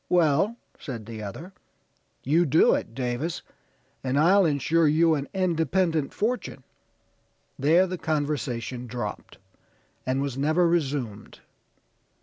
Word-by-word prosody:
'Well,' 175 +5 +3 0.2
said 115 -7 -7
the 110 -1 -7
other; 150 - -8 0.7
'you 160 +6 +3
do 155 +4 +5
it, 115 - -3
Davis, 130 +6 -3 0.6
and 130 +1 0
I'll 180 +5 +5
insure 160 +2 +2
you 160 +2 +4
an 140 -2 -2
independent 165 -4 0
fortune.' 220 - -3 1.0
There 160 +7 +4
the 185 -1 -5
conversation 135 -6 -2
dropped, 115 -4 -6 0.7
and 130 +1 -1
was 135 -2 -3
never 155 +5 +3
resumed. 135 -10 -2
150 Hz, 115 wpm, -26 LUFS, 130-170 Hz, 1.0 s, do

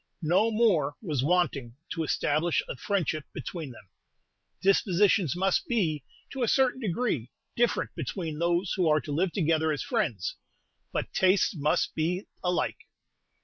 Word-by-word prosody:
No 180 +8 +3
more 195 -11 +2
was 150 - -2
wanting 145 -7 +1 0.2
to 165 - -1
establish 155 +2 +1
a - - -5
friendship 165 -2 -1
between 165 -6 -6
them. 115 -5 -13 0.7
Dispositions 195 - +3
must 195 - +1
be, 170 - 0 0.3
to 270 - -5
a 240 - +2
certain 260 +1 +2
degree, 180 - -1 0.3
different 240 0 +1
between 160 0 -4
those 175 +2 +1
who 180 -5 +2
are 155 0 +4
to 150 - -7
live 170 +5 +1
together 160 -3 +1
as 145 - -2
friends, 160 - -1 0.5
but - - -3
tastes 190 +1 +3
must 150 -1 +1
be 175 +5 -1 0.2
alike. 180 -1 -1
175 Hz, 145 wpm, -28 LUFS, 150-195 Hz, 0.7 s, are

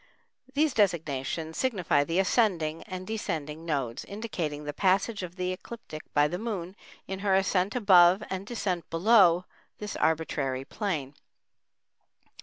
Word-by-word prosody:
These 300 -1 +2
designations 160 -5 -1
signify 185 - +2
the 165 +2 -1
ascending 185 -6 +1
and 185 -2 -6
descending 165 -7 -4
nodes, 135 -6 -2
indicating 175 -9 -4
the 145 0 -4
passage 195 +5 +1
of 180 -1 -7
the 185 0 -2
ecliptic 185 -4 -9
by 145 0 +4
the 175 +4 -4
Moon 195 -5 -4 0.3
in 190 0 -5
her 195 -1 +2
ascent 190 +1 +1
above 190 -3 +6
and 190 +1 -5
descent 190 -7 -3
below 180 -1 +5 0.3
this 210 -1 -6
arbitrary 140 -5 0
plane. 155 -11 -3
180 Hz, 130 wpm, -28 LUFS, 155-205 Hz, 0.3 s, above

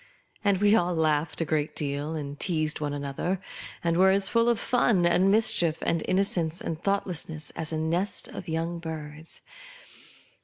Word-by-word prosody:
And 200 -2 +3
we 205 +2 +4
all 175 -4 +1
laughed 155 0 +1
a - - +1
great 155 -1 -1
deal, 145 +2 -2
and 145 -2 -6
teased 155 -4 0
one 150 -1 -2
another, 145 +6 -3 0.4
and 170 0 +1
were 190 +1 +6
as 195 0 +3
full 230 0 +3
of 235 - +2
fun 225 -7 +2
and 180 +2 +4
mischief, 210 -6 +4
and 165 - 0
innocence 180 -3 0
and 160 0 -5
thoughtlessness, 170 -6 -2
as 160 -1 -3
a 160 - -2
nest 170 +5 -1
ol - - -5
young 165 +1 -2
birds. 155 -1 -7
165 Hz, 165 wpm, -27 LUFS, 155-190 Hz, 0.4 s, were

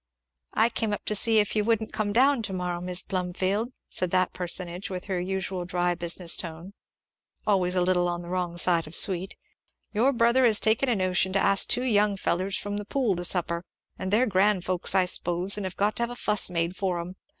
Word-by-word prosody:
"I 225 +2 +3
came 225 -2 -2
up 205 - -6
to - - -1
see 220 +2 +3
if 210 0 +1
you 210 - +1
wouldn't 225 0 -1
come 210 -2 -2
down 260 +3 +3
to 200 -3 -3
morrow, 180 -1 -3
Mis' 180 0 -1
Plumfield," 190 +5 -2 0.2
said 185 - -1
that 185 0 +1
personage, 180 +1 -1
with 185 -1 -6
her 190 -3 -2
usual 190 0 -3
dry 175 0 -1
business 170 0 +2
tone, 170 +3 -7 0.7
always 185 -3 +1
a 180 - +2
little 180 -1 +1
on 175 0 -4
the - - -11
wrong 175 -1 -3
side 170 -2 +2
of 155 - -10
sweet; 190 -2 +1 0.6
"your 235 +6 +2
brother 235 +1 +2
has 225 -4 +5
taken 225 +5 +2
a 240 - +2
notion 185 0 0
to 195 - +2
ask 195 0 +3
two 250 - +1
young 210 -4 +2
fellers 185 +1 -1
from 205 0 -4
the 205 - -6
Pool 235 -4 0
to 175 - -4
supper, 170 -1 +1 0.4
and 190 - -4
they're 225 +5 +3
grand 195 -3 +1
folks 185 +1 +1
I 185 -1 +4
s'pose, 180 +1 +1
and 205 -2 -3
have 185 - -9
got 205 +1 0
to - - -3
have 235 - -1
a 245 - -7
fuss 210 -5 +2
made 170 0 -2
for 185 -3 -2
'em. 175 +2 -7
190 Hz, 220 wpm, -26 LUFS, 180-210 Hz, 0.7 s, has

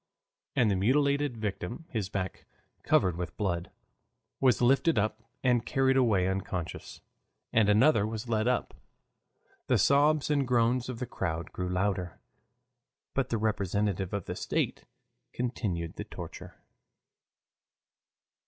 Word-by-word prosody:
And 115 -4 +3
the - - +2
mutilated 140 +5 +2
victim, 105 - -4
his 105 -6 -2
back 95 -2 -4 0.3
covered 90 -4 +3
with 90 0 -5
blood, 90 -4 -1 0.7
was 130 -3 +4
lifted 135 +4 +3
up 110 +2 0 0.2
and 125 -3 +3
carried 130 +2 +2
away 110 -8 +3
unconscious, 95 -3 -4 0.5
and 110 -2 +4
another 110 0 +4
was 110 +1 -5
led 110 0 +1
up. 125 -1 0 0.9
The - - +3
sobs 150 +2 +3
and 140 -3 +2
groans 120 +1 +2
of 125 - -4
the 125 - -3
crowd 85 -6 -3
grew 90 0 -3
louder. 90 -1 -1 0.9
But 135 -1 0
the 115 - 0
representative 100 -3 -1
of 100 -3 -3
the - - -4
state - - -2 0.5
continued 100 -9 -3
the - - -3
torture. - - -9
110 Hz, 125 wpm, -29 LUFS, 95-125 Hz, 0.9 s, was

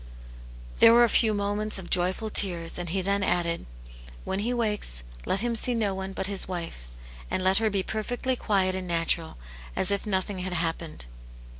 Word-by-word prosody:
There 230 - +8
were 240 +1 +7
a 235 - +4
few 220 +1 +4
moments 205 +1 -1
of 185 -2 -9
joyful 185 +4 +1
tears, 175 -5 +2
and 175 -1 -4
he 190 +2 -1
then 200 +1 0
added, 175 -3 0 0.6
"When 190 - -2
he 225 +4 -1
wakes 210 - 0 0.2
let 195 - 0
him 240 0 -1
see 245 +2 +2
no 210 -4 0
one 190 0 -5
but 190 - -2
his 195 -1 +1
wife, 170 - -6 0.4
and 185 - -1
let 190 +2 +3
her 225 -1 +2
be 195 -2 0
perfectly 245 +5 -2
quiet 195 -5 +1
and 185 -1 -3
natural, 165 -1 -1 0.4
as 190 - +2
if 200 +1 -1
nothing 190 0 -1
had 185 0 -3
happened." 165 - -3
190 Hz, 185 wpm, -27 LUFS, 175-215 Hz, 0.6 s, There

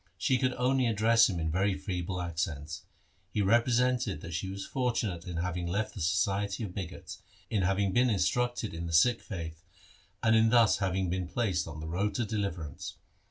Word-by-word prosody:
She 130 -1 +2
could 130 -1 +1
only 130 0 +2
address 115 +1 +4
him 90 -3 -2
in 80 -1 -1
very 95 +3 +1
feeble 90 -2 -3
accents. 80 0 -3 0.5
He 105 - 0
represented 120 - +2
that 85 - -7
she 85 +3 -2
was 95 0 -5
fortunate 115 -9 -1
in 85 -2 -4
having 90 0 -2
left 100 +5 -1
the 100 - -7
society 95 +6 0
of 95 -4 -5
bigots, 90 -3 -7 0.3
in 105 -4 +1
having 95 +1 +1
been 125 +1 +4
instructed 120 +1 0
in 85 +1 -4
the 85 - -5
Sikh 115 +9 +4
faith, 85 -4 -7 0.6
and 110 -1 +5
in 110 0 +5
thus 115 -4 +5
having 95 -2 0
been 90 -1 -2
placed 95 -7 -1
on 80 -1 -7
the 80 - -5
road 95 +6 -1
to 120 - 0
deliverance. 100 -8 -4
95 Hz, 185 wpm, -30 LUFS, 85-115 Hz, 0.6 s, and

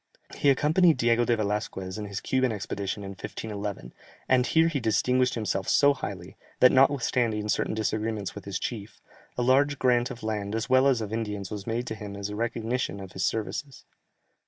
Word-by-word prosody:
He 145 - +3
accompanied 155 +4 +4
Diego 120 0 +3
de 120 -1 +2
Velasquez 105 -2 -3
in 105 - -4
his 100 0 -5
Cuban 130 -2 +1
expedition 100 -1 -4
in 95 - -6
1511, 100 - -6 0.3
and 130 -1 +3
here 160 0 +4
he 160 -4 -1
distinguished 125 +2 +2
himself 105 -4 -2
so 140 0 +5
highly, 95 -8 -7 0.2
that 125 - +7
notwithstanding 125 -5 +2
certain 110 - 0
disagreements 110 -2 -2
with 100 - -9
his 100 -2 -3
chief, 105 -2 -6 0.4
a 125 - +1
large 140 +3 +3
grant 125 -1 +2
of 120 - -9
land 105 -1 -2
as 115 - -2
well 130 +1 +5
as 130 -4 +2
of 105 0 -5
Indians 105 -4 -3
was 105 -1 -6
made 120 +2 -1
to - - -4
him 105 -2 -7
as 100 0 -4
a 105 - -5
recognition 115 -1 -2
of 95 -2 -9
his 95 0 -4
services. 125 +7 -3
110 Hz, 185 wpm, -27 LUFS, 100-125 Hz, 0.4 s, that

